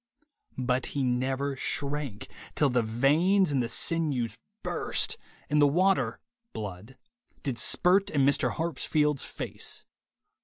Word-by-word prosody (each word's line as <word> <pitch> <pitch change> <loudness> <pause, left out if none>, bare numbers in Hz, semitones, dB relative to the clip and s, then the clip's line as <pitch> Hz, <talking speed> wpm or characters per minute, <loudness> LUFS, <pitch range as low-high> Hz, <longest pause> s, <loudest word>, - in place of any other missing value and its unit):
But 125 0 0
'he 140 - +1
never 130 +2 0
shrank, 140 -4 -3 0.3
till 145 -3 +3
the 125 -1 +3
veins 150 - +3
and 135 -2 +2
the 115 - -2
sinews 145 -9 0 0.3
burst, - - +1 0.3
and 150 +1 +2
the 145 - +7
water 175 -6 +2 0.3
(blood) 105 +4 -7 0.5
did 135 -5 -2
spirt 190 +3 +3
in 140 -3 +2
Mr. 140 0 +3
Harpsfield's 150 -2 0
face.' - - -5
140 Hz, 120 wpm, -28 LUFS, 125-150 Hz, 0.5 s, the